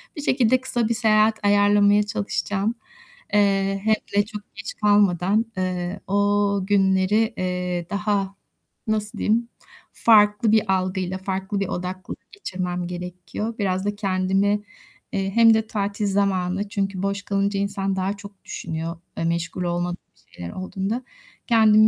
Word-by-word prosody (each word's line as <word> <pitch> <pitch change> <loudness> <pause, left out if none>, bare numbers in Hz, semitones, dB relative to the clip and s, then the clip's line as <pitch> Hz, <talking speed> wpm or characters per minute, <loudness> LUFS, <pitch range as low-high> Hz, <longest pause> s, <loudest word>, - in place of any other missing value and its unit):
Bir 295 - -5
şekilde 255 -2 +3
kısa 240 -3 -1
bir - - +2
seyahat 220 -1 +3
ayarlamaya 205 0 +5
çalışacağım. 205 +1 -2 0.6
Eee, 195 -1 +2
hem 220 0 +4 0.2
de 205 0 +4
çok 210 -1 -10
geç 205 - -6
kalmadan, 205 0 +3
eee, 185 +1 -2
o 205 0 +2
günleri, 200 +3 +3
eee, 180 -1 -2
daha, 200 -1 -1 0.5
nasıl 215 -1 -1
diyeyim, 235 +2 +1 0.4
farklı 210 -1 +4
bir 215 -3 +3
algıyla, 185 0 -1
farklı 190 +1 -3
bir 195 - -1
odaklılık 180 +1 -6
geçirmem 180 - -4
gerekiyor. 180 +5 -5
Biraz 190 -1 0
da 205 - -1
kendimi, 195 +1 +1 0.5
eee, 195 0 -1
hem 230 -1 +7
de 220 0 +1
tatil 205 -1 -2
zamanı, 195 0 0
çünkü 195 -2 -2
boş 200 0 -1
kalınca 200 0 0
insan 195 -1 -1
daha 190 +2 -1
çok 200 -1 -13
düşünüyor 165 +1 -5 0.2
e, - - -2
meşgul 170 +2 -1
olmadığım 175 0 -1 0.4
şeyler 85 -1 -6
olduğunda. 195 +6 -3 0.4
Kendimi 215 -2 +6
200 Hz, 135 wpm, -23 LUFS, 185-210 Hz, 0.6 s, hem